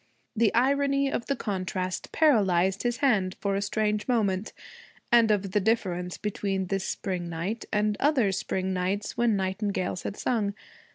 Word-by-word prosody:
The 225 -1 +3
irony 275 +2 +2
of 235 - -3
the 275 - 0
contrast 185 -4 -3
paralyzed 195 - +3
his 240 0 -1
hand 195 -8 +2
for 200 -1 -1
a 200 - 0
strange 210 +1 -1
moment, 215 -5 0 0.6
and 235 -2 +6
of 200 -2 +1
the 210 - +2
difference 185 -4 -1
between 195 -2 -2
this 195 +1 -2
spring 180 -3 -3
night 180 +7 -4
and 210 0 +1
other 265 -8 +3
spring 190 0 -2
nights 190 +3 -2
when 235 -2 +2
nightingales 190 -1 -2
had 205 - -5
sung. 210 -5 0
205 Hz, 155 wpm, -27 LUFS, 190-230 Hz, 0.6 s, and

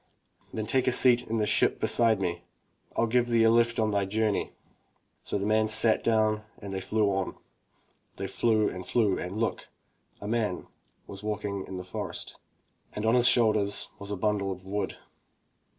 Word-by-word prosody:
"Then 110 - -4
take 130 +4 0
a - - +4
seat 125 -1 +5
in 115 - -2
the 105 - +1
ship - - +2
beside 115 -3 +3
me. 85 -2 -2 0.6
rU 115 - +3
give 120 +1 +1
thee 115 -1 +3
a 115 - +5
lift 115 0 +2
on 110 -1 +1
thy 100 -1 0
journey." 105 +1 -1 0.7
So - - -3
the 100 - -3
man 110 +1 +2
sat 110 +1 +3
down 110 -2 +2 0.2
and 100 -2 -8
they 95 - -3
flew 105 +1 0
on. 95 -1 -2 0.8
They - - -5
flew 110 -2 +1
and 90 0 -5
flew 105 0 +1
and 90 +3 -5
look! 115 +1 -2 0.3
— - - -40
a 100 - -7
man 110 -4 -1 0.4
v/as 95 - -9
walking 105 -2 -4
in 95 - -6
the 90 - -6
forest, 90 - -6 0.5
and 105 - -4
on 110 - +3
his 125 -1 +5
shoulders 105 -5 +2
was 100 - -7
a 105 - -3
bundle 100 -1 -1
of 95 0 -8
wood. 100 +2 -3
110 Hz, 185 wpm, -28 LUFS, 100-115 Hz, 0.8 s, seat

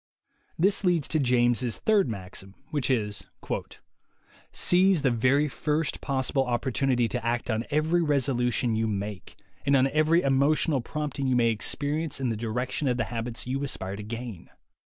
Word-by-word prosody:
This 195 +5 +2
leads 175 -6 +2
to 155 - +1
James' 120 -2 +2
third 205 - +2
maxim, 95 -1 -7 0.2
which 145 -3 0
is: 105 -5 0 1.3
"Seise 185 -2 +3
the 135 - +3
very 130 +6 +2
first 150 +1 -2
possible 135 0 0
opportunity 125 0 +1
to 125 0 -4
act 120 +1 -1
on 110 +2 -1
every 155 +3 +2
resolution 125 -6 +1
you 110 0 0
make, 100 -1 -5 0.3
and 140 +1 +3
on 130 -1 +4
every 155 +3 +3
emotional 140 +1 +2
prompting 145 +1 -3
you 130 - +2
may 115 -1 +3
experience 145 +7 -1
in 130 -2 0
the 115 - -1
direction 120 +6 -2
of 125 -1 +1
the 120 - +1
habits 115 0 -4
you 135 +3 -2
aspire 95 -8 -3
to 105 - -7
gain. 115 -3 -7
130 Hz, 155 wpm, -27 LUFS, 115-150 Hz, 1.3 s, on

